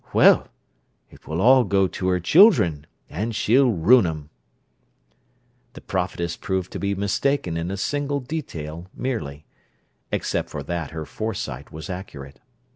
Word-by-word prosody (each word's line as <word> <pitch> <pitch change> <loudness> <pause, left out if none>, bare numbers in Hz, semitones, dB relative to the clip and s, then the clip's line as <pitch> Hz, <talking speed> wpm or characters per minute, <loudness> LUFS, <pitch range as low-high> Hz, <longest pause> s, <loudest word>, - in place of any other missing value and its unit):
"Well, - - +5 0.6
it - - -18
will 80 +1 -3
all 130 +4 +6
go 95 -2 +2
to 90 +1 -4
her 90 -1 +2
children, 90 - +4 0.2
and 110 +7 -4
she'll 130 +5 +3
ruin 100 +3 +5
'em!" 75 -2 -6 1.4
The - - -11
prophetess 85 0 -3
proved 95 -1 -3
to - - -5
be 100 0 -1
mistaken 100 0 0
in 85 +1 -3
a 100 - -4
single 145 +6 -1
detail 90 - -6
merely: 75 - -4 0.7
except - - -2
for 70 - -6
that, 85 0 -4
her 80 -1 -6
foresight 75 - -5
was 80 +3 -8
accurate. 75 -8 -8
90 Hz, 140 wpm, -23 LUFS, 80-115 Hz, 1.4 s, all